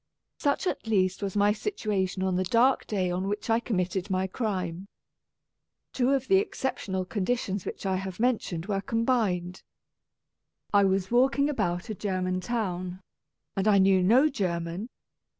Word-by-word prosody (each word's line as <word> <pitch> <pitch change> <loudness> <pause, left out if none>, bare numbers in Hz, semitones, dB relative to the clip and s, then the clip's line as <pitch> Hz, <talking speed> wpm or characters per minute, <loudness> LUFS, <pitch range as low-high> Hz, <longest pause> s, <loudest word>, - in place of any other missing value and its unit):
Such 285 +5 0
at 360 - -2
least 190 -3 +1
was 200 -1 -3
my 205 +1 +4
situation 210 - -2
on 190 -1 +1
the 185 - +1
dark 235 +8 +3
day 185 -4 0
on 185 +2 -2
which 205 +3 -2
I 225 - +4
committed 190 -4 -2
my 185 0 +1
crime. 190 -3 -3 1.1
Two 250 -1 +1
of 270 -1 +1
the 385 - +5
exceptional 225 - -2
conditions 200 0 -2
which - - -6
I 190 -1 +1
have 190 0 -6
mentioned 220 -9 0
were 195 -1 -1
combined. 210 -7 0 1.1
I 200 -1 +6
was 190 0 0
walking 270 +4 +3
about 185 -4 -2
a - - -2
German 185 -2 -2
town, 185 -5 -3 0.6
and 195 +2 0
I 205 -2 +6
knew 190 -1 +5
no 240 +11 +5
German. 180 - -3
195 Hz, 150 wpm, -27 LUFS, 185-230 Hz, 1.1 s, I